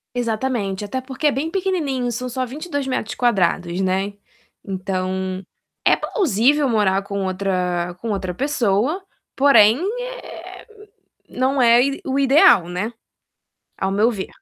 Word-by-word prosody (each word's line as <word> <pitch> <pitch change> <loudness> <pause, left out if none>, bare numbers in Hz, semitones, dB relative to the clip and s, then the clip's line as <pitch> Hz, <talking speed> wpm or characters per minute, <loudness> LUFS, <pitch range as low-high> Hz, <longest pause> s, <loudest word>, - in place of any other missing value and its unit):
Exatamente. 225 -4 -2
Até 260 +6 -3
porque 265 +3 -2
é - - +4
bem 300 +4 -2
pequenininho, 310 -10 -1
são 250 +2 -4
só 255 +1 -2
22m², 245 - -1
né. 190 +2 0 0.5
Então 185 -1 -3 0.4
é - - +6
plausível 285 - +1
morar 200 -3 +2
com 200 -1 -4
outra 180 -2 -1
com 230 - -5
outra 190 -3 -2
pessoa, 260 - 0 0.3
porém, 265 -3 +6 0.2
eh, - - -9 0.6
não 260 +1 0
é 235 0 +6
o - - +5
i 275 0 -2
o 270 0 0
ideal, 270 - +5
né, 205 +7 -3 0.9
ao 190 - -1
meu 210 +4 +3
ver. 195 -4 -5
230 Hz, 130 wpm, -21 LUFS, 190-270 Hz, 0.9 s, é